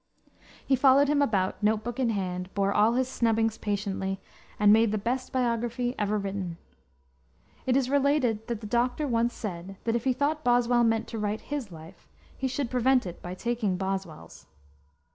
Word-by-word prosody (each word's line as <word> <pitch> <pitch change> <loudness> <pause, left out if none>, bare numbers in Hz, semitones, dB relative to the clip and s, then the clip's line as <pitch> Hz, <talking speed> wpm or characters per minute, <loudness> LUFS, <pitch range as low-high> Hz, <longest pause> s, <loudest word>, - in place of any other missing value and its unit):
He 270 - +3
followed 275 +2 +5
him 295 -1 +3
about, 200 -9 0
note 215 +1 +2
book 240 +2 -5
in 250 -3 +2
hand, 185 -3 -3
bore 200 0 +1
all 215 +3 +4
his 255 +1 +1
snubbings 225 -3 0
patiently, 195 -2 -2 0.4
and 210 0 +6
made 225 0 +4
the 215 - 0
best 245 +5 -2
biography 240 -1 -1
ever 210 0 +1
written. 195 -4 -4 1.1
It 255 0 +3
is 265 -2 +1
related 265 -5 +1
that 235 -3 -3
the - - -7
doctor 245 +6 0
once 235 -1 +1
said 190 -2 -6
that 230 0 0
if 235 - -2
he 260 - +3
thought 300 +4 -1
Boswell 245 -1 +3
meant 225 0 +1
to 225 - -5
write 210 +1 -2
his 280 -9 -5
life, 165 +3 -13 0.3
he 265 - -2
should 260 -1 -3
prevent 255 0 +3
it 175 -2 -7
by 180 +1 -6
taking 225 -3 -1
Boswell's. 190 - -5
225 Hz, 180 wpm, -27 LUFS, 200-250 Hz, 1.1 s, and